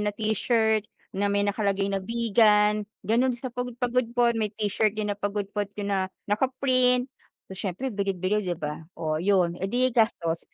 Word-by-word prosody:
na 210 - 0
t-shirt 220 0 +1 0.2
na 200 +1 0
may 200 0 +1
nakalagay 200 -1 0
na 195 - 0
Vigan, 210 -1 +3 0.2
ganun 240 +4 +3
din 245 - -4
sa 255 - -4
Pagud 245 -1 -4
Pagudpud 245 -1 +1
may 215 - +1
t-shirt 210 0 0
din 210 -1 -1
na - - -4
Pagudpud 205 0 -2
pina 200 -2 -1 0.2
naka-print. 255 +2 +2 0.4
So - - -10
siyempre 205 +7 -4
bili-bili 195 0 0
'di 175 - -1
ba 150 0 -5 0.2
oh, 155 -1 -2
ayun 180 -2 +2
eh, 190 - -1
di 250 +3 +1
gastos. 170 -8 +1
210 Hz, 165 wpm, -26 LUFS, 195-235 Hz, 0.4 s, Vigan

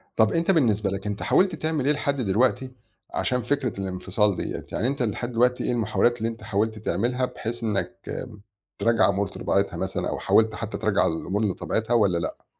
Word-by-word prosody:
طَب 110 -1 +4
أنت 165 +3 +2
بالنسبة 110 - +2
لك 100 +1 -4
أنت 105 -1 -3
حاولت 185 -2 +3
تعمل 155 -3 -1
إيه 150 - +4
لحد 140 -1 -1
دلوقتي 125 +5 +1 0.4
عشان 125 -1 0
فكرة 130 -5 -1
الانفصال 95 +2 0
ديّة؟ - - -4
يعني 120 - 0
أنت 135 -2 -1
لحد 120 +2 -2
دلوقتي 125 +2 +2
إيه - - 0
المحاولات 120 +1 +2
اللي 115 -1 -1
أنت 115 -1 -9
حاولت 110 +2 -1
تعملها 120 +6 0
بحيث 120 -2 -6
إنّك 110 +2 -2 0.8
ترجّع 115 -3 +4
أمور 100 +1 0
لطبيعتها - - -1
مثلًا - - -2
أو - - -3
حاولت 110 -1 +3
حتّى 110 0 -4
ترجّع 105 -2 +2
الأمور 95 +6 -1
لطبيعتها 110 +4 -1
والّا 100 -7 +3
لأ؟ 85 - -5
115 Hz, 180 wpm, -25 LUFS, 100-125 Hz, 0.8 s, طَب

